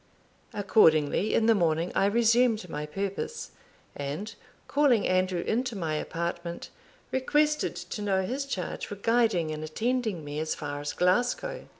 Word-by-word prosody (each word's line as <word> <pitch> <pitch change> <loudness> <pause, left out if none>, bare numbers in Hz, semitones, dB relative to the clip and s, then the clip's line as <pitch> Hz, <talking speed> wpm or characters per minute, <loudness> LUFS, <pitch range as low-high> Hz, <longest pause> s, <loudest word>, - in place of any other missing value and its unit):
Accordingly 190 -3 +3
in 220 - +3
the 225 - +6
morning 170 -3 +1
I 195 - +3
resumed 230 -1 +3
my 150 -2 -5
purpose, 200 - -4 0.4
and 150 +10 -5 0.3
calling 275 -7 +3
Andrew 185 -1 +1
into 240 +3 -1
my 165 -5 -2
apartment, 170 +2 -4 0.4
requested 300 +3 +1
to 210 - -6
know 195 -2 +1
his 270 +8 -3
charge 185 -10 -4
for 205 - -6
guiding 210 -6 +1
and 155 0 -5
attending 220 +1 -2
me 145 +1 -4
as 155 0 -2
far 145 -1 -5
as 145 - -3
Glasgow. 245 - 0
195 Hz, 140 wpm, -28 LUFS, 165-235 Hz, 0.4 s, the